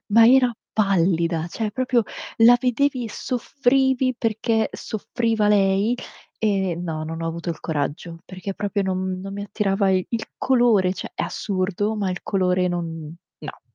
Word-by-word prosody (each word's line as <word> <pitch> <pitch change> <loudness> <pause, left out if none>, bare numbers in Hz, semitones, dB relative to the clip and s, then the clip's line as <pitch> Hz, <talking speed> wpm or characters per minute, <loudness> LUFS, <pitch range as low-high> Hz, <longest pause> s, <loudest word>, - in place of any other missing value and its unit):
ma 230 +1 +8
era 250 -1 +5 0.2
pallida, 170 -5 +1
cioè 215 +3 -3
proprio, 255 0 +1 0.4
la 240 +2 +8
vedevi, 255 0 +1
soffrivi 260 +1 +1
perché 225 0 0
soffriva 225 -1 -1
lei, 200 +3 +3 0.5
e 195 -4 +1
no, 160 -3 -4
non 165 +1 -5
ho - - -2
avuto 170 +1 -4
il 165 - -6
coraggio, 160 +2 -3
perché 185 +1 -6
proprio 205 -1 -1
non 185 -1 -2
non 195 +1 -7
mi 200 0 -5
attirava 200 -1 0
i 185 -1 +2
il 230 -2 -2
colore. 235 -8 +3
Cioè, 185 - -7
è - - -2
assurdo, 200 +2 -2
ma 195 -3 -1
il 180 - -5
colore 185 -2 +1
non 165 -3 -4 0.2
no. - - -9
200 Hz, 155 wpm, -23 LUFS, 180-230 Hz, 0.5 s, ma